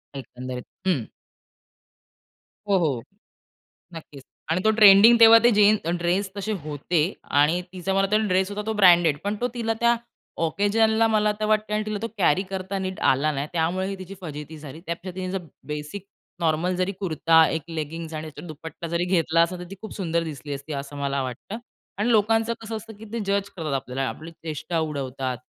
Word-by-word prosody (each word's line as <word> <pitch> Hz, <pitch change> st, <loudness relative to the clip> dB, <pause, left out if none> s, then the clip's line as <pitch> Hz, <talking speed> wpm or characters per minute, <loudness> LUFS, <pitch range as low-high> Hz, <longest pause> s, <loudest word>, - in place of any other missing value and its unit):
एकंदरीत. 125 Hz, -1 st, -7 dB, 0.2 s
हं. 145 Hz, -12 st, +1 dB, 1.6 s
हो, 195 Hz, -, +4 dB
हो. 145 Hz, -9 st, 0 dB, 0.9 s
नक्कीच. 150 Hz, -4 st, -10 dB, 0.3 s
आणि 175 Hz, +3 st, +1 dB
तो 220 Hz, -, +6 dB
ट्रेंडिंग 215 Hz, +2 st, +8 dB
तेव्हा 230 Hz, 0 st, +10 dB
ते 240 Hz, -, +7 dB
जीन्स 210 Hz, 0 st, +5 dB, 0.2 s
ड्रेस 180 Hz, +3 st, 0 dB
तसे 200 Hz, +2 st, -3 dB
होते 155 Hz, +3 st, -1 dB, 0.4 s
आणि 160 Hz, +5 st, +3 dB
तिचा 190 Hz, +1 st, -3 dB
मला 195 Hz, -, +3 dB
वाटतो 195 Hz, +2 st, +2 dB
ड्रेस 190 Hz, 0 st, +1 dB
होता 205 Hz, +1 st, -4 dB
तो 220 Hz, -, -1 dB
ब्रँडेड. 175 Hz, -7 st, +5 dB
पण 205 Hz, +1 st, -1 dB
तो 245 Hz, -, +2 dB
तिला 230 Hz, -2 st, -1 dB
त्या 235 Hz, 0 st, +4 dB, 0.5 s
ओकेजनला 220 Hz, +6 st, +2 dB
मला 215 Hz, -1 st, +2 dB
तर 215 Hz, -, 0 dB
वाटते 215 Hz, 0 st, +1 dB
आणि 215 Hz, 0 st, 0 dB
तिला 215 Hz, -1 st, -2 dB
तो 230 Hz, -, -2 dB
कॅरी 185 Hz, -1 st, +3 dB
करता 190 Hz, 0 st, -4 dB
नीट 190 Hz, 0 st, -4 dB
आला 140 Hz, +4 st, +2 dB
नाही, 140 Hz, 0 st, -3 dB
त्यामुळे 175 Hz, +3 st, 0 dB
ही 195 Hz, 0 st, -4 dB
तिची 185 Hz, +1 st, -8 dB
फजिती 150 Hz, -2 st, -7 dB
झाली. 150 Hz, 0 st, -10 dB
त्यापेक्षा 175 Hz, +2 st, -5 dB
तिने 185 Hz, -1 st, -4 dB
जर 195 Hz, -, -2 dB, 0.3 s
बेसिक 150 Hz, +6 st, -6 dB, 0.3 s
नॉर्मल 170 Hz, +2 st, +1 dB
जरी 185 Hz, +2 st, 0 dB
कुर्ता, 165 Hz, -3 st, +4 dB
एक 160 Hz, -, -2 dB
लेगिंग्स 160 Hz, 0 st, -5 dB
आणि 155 Hz, 0 st, -4 dB
त्याच्यावर 155 Hz, +2 st, -10 dB
दुपट्टा 160 Hz, +2 st, -8 dB
जरी 170 Hz, +1 st, -1 dB
घेतला 165 Hz, -2 st, +2 dB
असता, 170 Hz, +2 st, +1 dB
तर -, -, -6 dB
ती -, -, -6 dB
खूप 220 Hz, -, -8 dB
सुंदर 170 Hz, -3 st, -1 dB
दिसली 145 Hz, -2 st, -6 dB
असती, 140 Hz, +2 st, -6 dB
असं 140 Hz, +1 st, -6 dB
मला 140 Hz, -1 st, -1 dB
वाटतं. 130 Hz, -, -6 dB, 0.4 s
आणि 215 Hz, +4 st, +1 dB
लोकांचं 225 Hz, +1 st, +3 dB
कसं 225 Hz, 0 st, -5 dB
असतं, 220 Hz, +1 st, -8 dB
की 220 Hz, -, -10 dB
ते 235 Hz, -, -2 dB
जज 200 Hz, 0 st, 0 dB
करतात 160 Hz, -5 st, -5 dB
आपल्याला, 135 Hz, 0 st, -2 dB
आपली 160 Hz, +2 st, -9 dB
चेष्टा 165 Hz, +1 st, -4 dB
उडवतात 135 Hz, -4 st, -3 dB
175 Hz, 185 wpm, -24 LUFS, 155-205 Hz, 1.6 s, तेव्हा